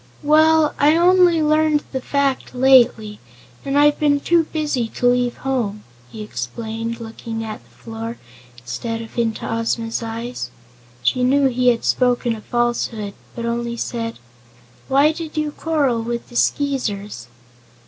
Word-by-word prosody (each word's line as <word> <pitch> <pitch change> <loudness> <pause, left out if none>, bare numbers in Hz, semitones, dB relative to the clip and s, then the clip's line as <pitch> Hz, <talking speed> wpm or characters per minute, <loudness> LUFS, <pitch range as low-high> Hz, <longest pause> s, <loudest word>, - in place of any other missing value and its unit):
"Well, 310 +1 +4
I 300 +2 +5
only 350 -1 +4
learned 305 0 +2
the 265 - -3
fact 275 -1 -1
lately, 240 -5 +4 0.4
and 275 +1 -1
I've 295 0 +4
been 290 -1 +3
too 335 +2 +2
busy 295 -7 -2
to 245 - -4
leave 245 0 +2
home," 230 -6 -2 0.3
he 215 - -8
explained, 225 - -5
looking 225 0 -6
at 215 -1 -7
the - - -26
floor 225 +1 -7 0.4
instead 125 - -5
of 225 - -13
into 225 -2 -1
Ozma's 230 0 -2
eyes. 230 +2 -5 0.5
She 250 - +2
knew 275 +2 +3
he 250 0 0
had 235 -2 +3
spoken 245 -2 +1
a 215 - -10
falsehood, 235 -3 -1 0.2
but 235 - -4
only 235 0 -2
said: 230 -1 -4 0.7
"Why 280 +3 +4
did 320 -1 -7
you 305 -1 0
quarrel 290 -7 0
with 235 +1 -4
the 240 - -14
Skeezers?" 210 - -1
245 Hz, 145 wpm, -20 LUFS, 225-290 Hz, 0.7 s, I